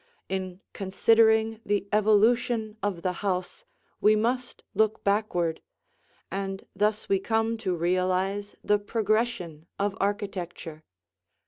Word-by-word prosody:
In 190 Hz, -1 st, -4 dB
considering 220 Hz, +3 st, +3 dB
the 200 Hz, -1 st, 0 dB
evolution 220 Hz, +1 st, +3 dB
of 190 Hz, -5 st, -2 dB
the 185 Hz, -, 0 dB
house 190 Hz, -, -2 dB, 0.3 s
we 215 Hz, +1 st, +5 dB
must 245 Hz, +3 st, -1 dB
look 220 Hz, 0 st, +1 dB
backward, 190 Hz, -5 st, 0 dB, 0.7 s
and 195 Hz, 0 st, -4 dB
thus 210 Hz, +2 st, 0 dB
we 195 Hz, -, +2 dB
come 225 Hz, +2 st, 0 dB
to 185 Hz, -4 st, -1 dB
realize 185 Hz, +4 st, 0 dB
the 210 Hz, 0 st, +3 dB
progression 205 Hz, -7 st, -1 dB
of 200 Hz, 0 st, -1 dB
architecture. 185 Hz, -6 st, -3 dB
205 Hz, 110 wpm, -27 LUFS, 185-220 Hz, 0.7 s, we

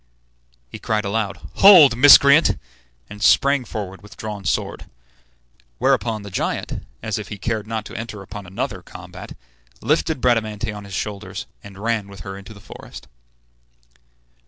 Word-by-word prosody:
He -, -, -10 dB
cried 110 Hz, -1 st, -1 dB
aloud, 100 Hz, 0 st, -2 dB, 0.2 s
"Hold, 175 Hz, -11 st, +8 dB
miscreant!" 140 Hz, -, +7 dB, 0.5 s
and 105 Hz, 0 st, -11 dB
sprang 140 Hz, +3 st, +4 dB
forward 95 Hz, -4 st, -6 dB
with 105 Hz, -, -15 dB
drawn 105 Hz, -3 st, -7 dB
sword. -, -, -2 dB, 0.9 s
Whereupon 110 Hz, -, 0 dB
the 100 Hz, -, -9 dB
giant, -, -, -3 dB, 0.2 s
as 110 Hz, -2 st, -2 dB
if 105 Hz, -, -7 dB
he 105 Hz, -, -7 dB
cared 110 Hz, +1 st, -3 dB
not 110 Hz, -1 st, -4 dB
to -, -, -10 dB
enter 110 Hz, -3 st, -7 dB
upon 100 Hz, 0 st, -9 dB
another 90 Hz, -, -4 dB
combat, -, -, -11 dB, 0.4 s
lifted 160 Hz, -4 st, 0 dB
Bradamante 110 Hz, -3 st, 0 dB
on 105 Hz, -1 st, -9 dB
his 100 Hz, -2 st, -8 dB
shoulders, 100 Hz, -1 st, -5 dB, 0.2 s
and 100 Hz, -1 st, -12 dB
ran 110 Hz, -1 st, -2 dB
with 100 Hz, -2 st, -12 dB
her 95 Hz, +3 st, -7 dB
into 100 Hz, +1 st, -11 dB
the -, -, -13 dB
forest. -, -, -12 dB
105 Hz, 150 wpm, -21 LUFS, 100-115 Hz, 0.9 s, Hold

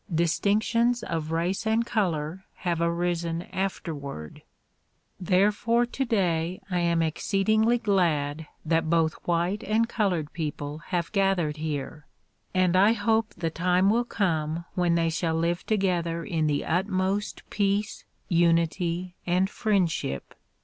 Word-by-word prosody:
Distinctions 215 Hz, +8 st, +1 dB
of 160 Hz, -2 st, -3 dB
race 175 Hz, +6 st, -1 dB
and 225 Hz, +1 st, +2 dB
color 180 Hz, -5 st, -1 dB
have 170 Hz, -2 st, -2 dB
arisen 170 Hz, 0 st, -1 dB
afterward. 145 Hz, -, -4 dB, 0.8 s
Therefore 210 Hz, +6 st, +2 dB
today 185 Hz, -9 st, 0 dB
I 180 Hz, -, +1 dB
am 170 Hz, -1 st, +2 dB
exceedingly 215 Hz, +8 st, +2 dB
glad 160 Hz, -8 st, 0 dB, 0.2 s
that 165 Hz, 0 st, +1 dB
both 165 Hz, -1 st, +3 dB
white 175 Hz, +4 st, 0 dB
and 220 Hz, +2 st, +1 dB
col 215 Hz, -4 st, +1 dB
ored 160 Hz, -5 st, -3 dB
people 150 Hz, -2 st, -4 dB
have 175 Hz, -2 st, -2 dB
gathered 195 Hz, -7 st, +1 dB
here 150 Hz, -1 st, -4 dB, 0.4 s
and 185 Hz, -1 st, +2 dB
I 200 Hz, +4 st, +6 dB
hope 225 Hz, -1 st, 0 dB
the 165 Hz, -2 st, -2 dB
time 180 Hz, +4 st, +2 dB
will 235 Hz, +2 st, +2 dB
come 165 Hz, -6 st, -1 dB
when 175 Hz, -2 st, +2 dB
they 165 Hz, -1 st, +1 dB
shall 160 Hz, 0 st, -1 dB
live 170 Hz, +1 st, -1 dB
together 175 Hz, -5 st, 0 dB
in 160 Hz, -6 st, 0 dB
the 145 Hz, -1 st, 0 dB
utmost 190 Hz, +3 st, -1 dB
peace, 205 Hz, +1 st, 0 dB, 0.2 s
unity 170 Hz, +1 st, +1 dB
and 185 Hz, +3 st, +2 dB
friend 200 Hz, -7 st, +1 dB
ship. 70 Hz, -, -4 dB
175 Hz, 130 wpm, -26 LUFS, 165-200 Hz, 0.8 s, I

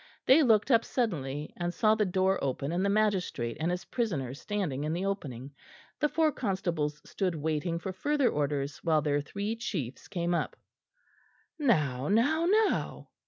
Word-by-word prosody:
They 275 Hz, +5 st, +7 dB
looked 225 Hz, -2 st, +4 dB
up 230 Hz, -1 st, +5 dB
suddenly, 150 Hz, -, -2 dB
and 175 Hz, 0 st, -2 dB
saw 215 Hz, +4 st, +3 dB
the 215 Hz, -2 st, +1 dB
door 190 Hz, +1 st, +1 dB
open 140 Hz, +2 st, -2 dB
and 175 Hz, +2 st, 0 dB
the 200 Hz, -, +2 dB
magistrate 195 Hz, -, 0 dB
and 160 Hz, +2 st, 0 dB
his 180 Hz, +2 st, -3 dB
prisoner 175 Hz, -, -2 dB
standing 150 Hz, -3 st, -3 dB
in 155 Hz, +1 st, -1 dB
the 180 Hz, +3 st, -2 dB
opening. 140 Hz, -, -4 dB, 0.5 s
The 300 Hz, -, +2 dB
four 315 Hz, 0 st, +2 dB
constables 175 Hz, -, -2 dB
stood 185 Hz, -4 st, -1 dB
waiting 160 Hz, +2 st, -1 dB
for 185 Hz, +2 st, -5 dB
further 285 Hz, +7 st, +1 dB
orders 145 Hz, -1 st, -1 dB
while 155 Hz, -3 st, +2 dB
their 145 Hz, -1 st, +1 dB
three 200 Hz, +8 st, -3 dB
chiefs 180 Hz, -, -4 dB
came 175 Hz, -1 st, -1 dB
up. 170 Hz, -, -1 dB, 1.0 s
"Now, 150 Hz, -, +1 dB
now, 290 Hz, -, +3 dB
now!" 430 Hz, +2 st, +1 dB
180 Hz, 165 wpm, -30 LUFS, 150-220 Hz, 1.0 s, They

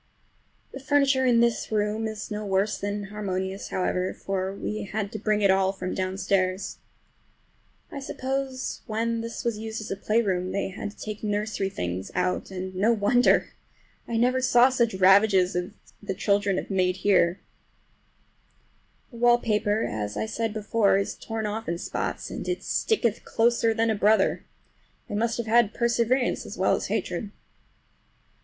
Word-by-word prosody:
The 270 Hz, -, -8 dB
furniture 275 Hz, -1 st, +2 dB
in 235 Hz, -2 st, +4 dB
this 235 Hz, -1 st, +1 dB
room 215 Hz, +1 st, 0 dB
is 215 Hz, 0 st, -6 dB
no 210 Hz, 0 st, -3 dB
worse 200 Hz, +1 st, 0 dB
than 205 Hz, 0 st, -2 dB
inharmonious, 195 Hz, -1 st, -4 dB
however, 185 Hz, 0 st, -1 dB
for 190 Hz, -1 st, -3 dB
we 210 Hz, +2 st, -4 dB
had 205 Hz, 0 st, -3 dB
to 215 Hz, -, -5 dB
bring 210 Hz, 0 st, +1 dB
it 195 Hz, -, +6 dB
all 190 Hz, 0 st, +3 dB
from 185 Hz, -1 st, -5 dB
downstairs. 185 Hz, 0 st, -1 dB, 1.1 s
I 280 Hz, -, -5 dB
suppose 265 Hz, -1 st, -3 dB
when 230 Hz, +1 st, -1 dB
this 230 Hz, 0 st, -6 dB
was 230 Hz, -3 st, -1 dB
used 220 Hz, 0 st, -5 dB
as 215 Hz, -, -7 dB
a -, -, 0 dB
playroom 195 Hz, -3 st, 0 dB
they 200 Hz, -, -1 dB
had 205 Hz, +2 st, -5 dB
to 205 Hz, -, -16 dB
take 215 Hz, -1 st, -6 dB
the 215 Hz, -, -3 dB
nursery 205 Hz, -1 st, -1 dB
things 90 Hz, -, -4 dB
out, 180 Hz, 0 st, -1 dB
and 185 Hz, 0 st, -5 dB
no 200 Hz, +5 st, +2 dB
wonder! 235 Hz, +3 st, +3 dB, 0.6 s
I 230 Hz, -, -1 dB
never 250 Hz, +2 st, +2 dB
saw 250 Hz, 0 st, +5 dB
such 235 Hz, -5 st, +1 dB
ravages 190 Hz, -1 st, +5 dB
as 180 Hz, +1 st, -1 dB, 0.3 s
the 200 Hz, -2 st, -4 dB
children 200 Hz, -1 st, +1 dB
have -, -, -4 dB
made 185 Hz, -1 st, +2 dB
here. 180 Hz, -3 st, +4 dB, 1.7 s
The 235 Hz, -, -11 dB
wallpaper, 225 Hz, -3 st, +2 dB
as 105 Hz, -1 st, -3 dB
I -, -, -1 dB
said 225 Hz, 0 st, -2 dB
before, 210 Hz, -1 st, +2 dB
is 200 Hz, -, -1 dB
torn 225 Hz, -1 st, -5 dB
off 215 Hz, 0 st, -3 dB
in 170 Hz, -, -1 dB
spots, -, -, -4 dB
and -, -, -6 dB
it 360 Hz, 0 st, -2 dB
sticketh 240 Hz, -, 0 dB
closer 230 Hz, 0 st, +2 dB
than 225 Hz, 0 st, +1 dB
a -, -, 0 dB
brother—they 210 Hz, 0 st, -1 dB
must 230 Hz, +2 st, 0 dB
have 235 Hz, -, -2 dB
had 225 Hz, -1 st, +3 dB
perseverance 235 Hz, +2 st, +1 dB
as -, -, -8 dB
well -, -, +3 dB
as -, -, -3 dB
hatred. 210 Hz, -, -2 dB
210 Hz, 160 wpm, -26 LUFS, 195-230 Hz, 1.7 s, it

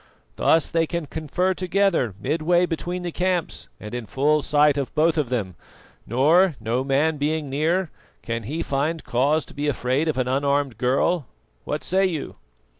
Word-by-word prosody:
Thus 165 Hz, -1 st, +2 dB
they 165 Hz, -1 st, +1 dB
can 170 Hz, -1 st, -3 dB
confer 160 Hz, +5 st, -1 dB
together 185 Hz, -, +1 dB
midway 165 Hz, -, +2 dB
between 175 Hz, +1 st, -4 dB
the 175 Hz, -, -3 dB
camps 180 Hz, -1 st, -2 dB
and 105 Hz, +1 st, -9 dB
in 120 Hz, -3 st, -5 dB
full 150 Hz, +6 st, +2 dB
sight 145 Hz, 0 st, +3 dB
of 140 Hz, -2 st, -3 dB
both 160 Hz, +1 st, +3 dB
of 150 Hz, -6 st, 0 dB
them, 105 Hz, -7 st, -2 dB, 0.5 s
nor, 155 Hz, -, +4 dB
no 115 Hz, +3 st, -1 dB
man 145 Hz, +3 st, +1 dB
being 150 Hz, 0 st, -1 dB
near, 165 Hz, +5 st, 0 dB, 0.3 s
can 115 Hz, 0 st, -3 dB
he 165 Hz, +3 st, -2 dB
find 150 Hz, +4 st, -1 dB
cause 145 Hz, +6 st, +1 dB
to -, -, -13 dB
be 145 Hz, +1 st, -3 dB
afraid 135 Hz, +2 st, 0 dB
of 155 Hz, -, 0 dB
an 130 Hz, -1 st, 0 dB
unarmed 140 Hz, -2 st, 0 dB
girl. 135 Hz, +5 st, +1 dB, 0.4 s
What -, -, -3 dB
say 190 Hz, +1 st, +2 dB
you?" 160 Hz, -6 st, -5 dB
150 Hz, 170 wpm, -23 LUFS, 135-170 Hz, 0.5 s, nor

